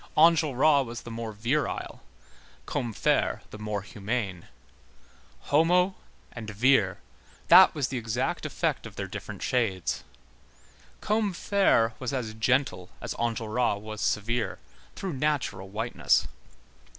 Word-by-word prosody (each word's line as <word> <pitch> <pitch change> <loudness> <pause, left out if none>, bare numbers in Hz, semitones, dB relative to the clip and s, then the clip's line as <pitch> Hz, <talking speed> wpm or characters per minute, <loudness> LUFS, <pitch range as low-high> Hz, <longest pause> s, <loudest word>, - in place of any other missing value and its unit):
Enjolras 155 -3 +5
was 120 -1 -7
the 120 - -8
more 115 -1 -5
virile, 120 +8 -2 0.6
Combeferre 115 -4 0
the 105 - -9
more 105 -2 -3
humane. 105 -3 -4 1.0
Homo 180 +5 +4 0.4
and 110 -3 -7
vir, 105 -2 +3 0.5
that - - +8
was 140 -5 -1
the 130 - -2
exact 115 +2 -2
effect - - -2
of - - -13
their - - -3
different - - -7
shades. 110 -8 0 1.0
Combeferre 200 - +2
was 130 +1 -3
as 120 -5 -3
gentle 110 -5 0
as - - -4
Enjolras 115 -1 0
was 110 0 -7
severe, 110 -2 -1 0.4
through 190 -3 -4
natural 130 -9 -1
whiteness. 110 +4 +1
120 Hz, 115 wpm, -27 LUFS, 105-140 Hz, 1.0 s, that